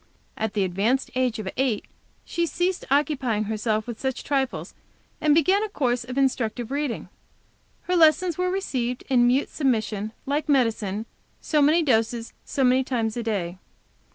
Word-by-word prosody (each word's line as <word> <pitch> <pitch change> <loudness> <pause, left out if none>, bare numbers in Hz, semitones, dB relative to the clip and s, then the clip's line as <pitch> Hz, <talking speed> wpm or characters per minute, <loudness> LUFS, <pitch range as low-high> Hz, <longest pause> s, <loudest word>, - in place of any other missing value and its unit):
At 220 -1 -3
the 200 - +2
advanced 205 +9 0
age 255 -2 0
of 215 -3 -5
eight, 250 -5 0 0.4
she 340 0 -1
ceased 360 +2 -1
occupying 270 -6 +1
herself 215 0 -1
with 235 -2 -6
such 265 -1 -2
trifles, 270 -2 -1 0.5
and 300 -1 +4
began 370 +6 +4
a 435 - -2
course 245 -9 0
of 250 +2 -7
instructive 245 -3 0
reading. 285 -3 -2 0.8
Her 365 - 0
lessons 330 +1 +4
were 365 +2 0
received 255 -10 -2
in 240 -2 +5
mute 260 +3 +2
submission, 220 -6 -1
like 295 +3 -1
medicine; 225 -6 +1 0.3
so 300 -2 +1
many 310 +4 +4
doses, 230 -3 0
so 275 - -1
many 255 +1 +4
times 230 -4 -1
a 240 - -2
day. 190 -6 -2
255 Hz, 155 wpm, -25 LUFS, 220-290 Hz, 0.8 s, in